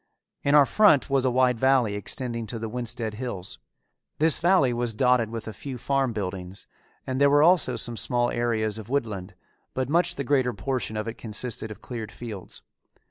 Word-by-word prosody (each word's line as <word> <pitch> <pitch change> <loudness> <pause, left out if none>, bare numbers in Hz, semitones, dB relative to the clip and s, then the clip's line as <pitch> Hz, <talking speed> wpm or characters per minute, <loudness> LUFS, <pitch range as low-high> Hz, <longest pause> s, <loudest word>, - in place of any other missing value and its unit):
In 140 +1 +3
our 145 -1 +8
front 145 - +4
was 135 -1 +2
a - - +4
wide 125 -1 +2
valley 130 -5 +3
extending 115 +2 -2
to 115 - -3
the 115 0 -4
Winsted 120 -1 -2
Hills. 105 -5 -6 0.6
This 160 0 +2
valley 170 -8 +3
was 120 -2 -1
dotted 125 -2 +3
with 115 -1 -6
a 110 - -5
few 130 +6 -7
farm 135 +1 0
buildings, 95 -3 -5 0.4
and 130 +1 -2
there 140 - +6
were 145 +1 +5
also 175 0 +4
some 120 -1 -3
small 120 0 +1
areas 110 -2 -1
of 110 +1 -10
woodland, 105 -8 -3 0.4
but 130 0 -1
much 175 +2 +2
the 140 - -3
greater 130 -2 +1
portion 110 +1 -3
of 110 - -3
it 115 - -6
consisted 110 0 -4
of 110 - -10
cleared 115 -4 -6
fields. 110 -6 -9
120 Hz, 190 wpm, -26 LUFS, 110-135 Hz, 0.6 s, our